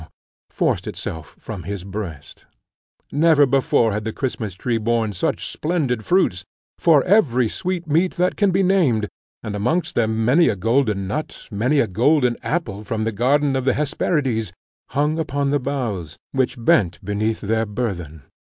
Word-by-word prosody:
forced - - -1
itself 80 -2 -6
from 105 -5 -7
his 95 +2 -5
breast. 95 -8 -7 0.7
Never 150 -1 +5
before 130 -4 +2
had 105 +1 -2
the 110 - -3
Christmas 110 -7 -4
tree 115 +3 -1
borne 115 -1 0
such 90 - -2
splendid 145 -9 -1
fruits, 140 - +2 0.4
for 155 -5 +5
every 130 - +3
sweetmeat 175 - -1
that 180 0 +1
can 205 -2 +2
be 190 +1 +2
named, 155 - +2 0.4
and 105 -1 -4
amongst 140 - 0
them 110 -1 +1
many 150 +8 +5
a - - 0
golden 110 -1 +1
nut, 150 +10 -5
many 125 +8 +1
a 140 - +4
golden 125 - +2
apple 115 - -3
from 110 +1 -2
the 110 - 0
garden 135 +6 +2
of 130 - 0
the 130 - +2
Hesperides 135 - -1 0.4
hung 150 +4 0
upon 140 -2 -1
the 145 - +2
boughs, 115 - -3
which 130 -1 0
bent 100 -6 +2
beneath 110 +2 -1
their 110 +1 0
burthen. 90 - -4
120 Hz, 155 wpm, -21 LUFS, 105-145 Hz, 0.7 s, Never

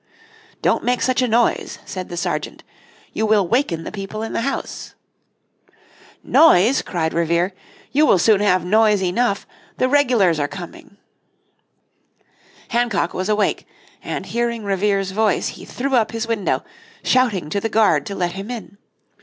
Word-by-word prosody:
"Don't - - +2
make 250 0 +1
such 255 0 +1
a 250 - +2
noise," 235 +1 +1
said 185 -1 -6
the 175 - -6
sergeant, - - -3 0.5
"you - - -2
will 210 -4 +3
waken 185 - 0
the - - -6
people 210 +1 -6
in 225 - -5
the - - -1
house." 275 +3 -4 1.3
"Noise," 260 - +5
cried 160 -3 -2
Revere, 170 +3 +1 0.4
"you 300 +2 +3
will - - +5
soon 205 +2 +3
have 185 -4 +2
noise 210 0 +3
enough 200 +3 0 0.3
the 255 - +2
regulars 245 - +3
are 145 - 0
coming." 190 +3 -10 1.7
Hancock 235 -7 0
was 185 +2 -3
awake, 210 -1 0 0.4
and - - -4
hearing 235 -1 -2
Revere's 195 -1 0
voice 210 -1 +1
he - - -10
threw 270 +2 -4
up 230 -4 +2
his 225 0 -3
window, 225 -4 -1 0.4
shouting 210 -12 +1
to 200 - -1
the 225 - -2
guard 205 -10 +2
to 200 - -5
let 175 -2 -1
him 195 +4 -7
in. 215 -4 -8
210 Hz, 155 wpm, -20 LUFS, 185-235 Hz, 1.7 s, Noise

